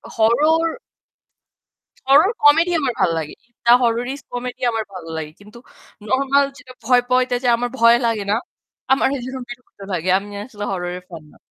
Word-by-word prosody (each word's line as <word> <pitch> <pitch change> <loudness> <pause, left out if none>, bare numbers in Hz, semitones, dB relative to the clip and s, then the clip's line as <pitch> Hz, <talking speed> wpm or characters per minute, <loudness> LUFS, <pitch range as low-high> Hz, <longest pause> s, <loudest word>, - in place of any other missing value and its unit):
Horror. 305 +9 +3 1.4
Horror 300 +9 +6
comedy 325 +4 +5
আমার 260 -4 -1
ভাল - - +3
লাগে। 155 -2 -5 0.3
দা 235 - +6
হরর 245 +4 -1
কমেডি 245 0 -5
আমার 225 -1 -2
ভাল 185 -3 -8
লাগে। 155 -1 -5
কিন্তু 210 +3 -15 0.5
নরমাল 275 +3 +2
যেটা 270 -3 -14
ভয় 245 +2 +4
পওয়াতে 255 0 +2 0.2
আমার 245 +1 -2
ভয় 230 +1 +6
লাগে 225 -3 0
না। 210 - +3 0.6
আমার 265 - +4 0.2
যেরকম 260 0 -6
বিরক্ত 240 -2 -12
লাগে। 180 +1 -2
আমি 205 +1 -7 0.2
আসলে 210 -5 -9
হররের 180 -1 -4
ফ্যান 165 -3 -10
না। - - -21
245 Hz, 155 wpm, -20 LUFS, 210-270 Hz, 1.4 s, হরর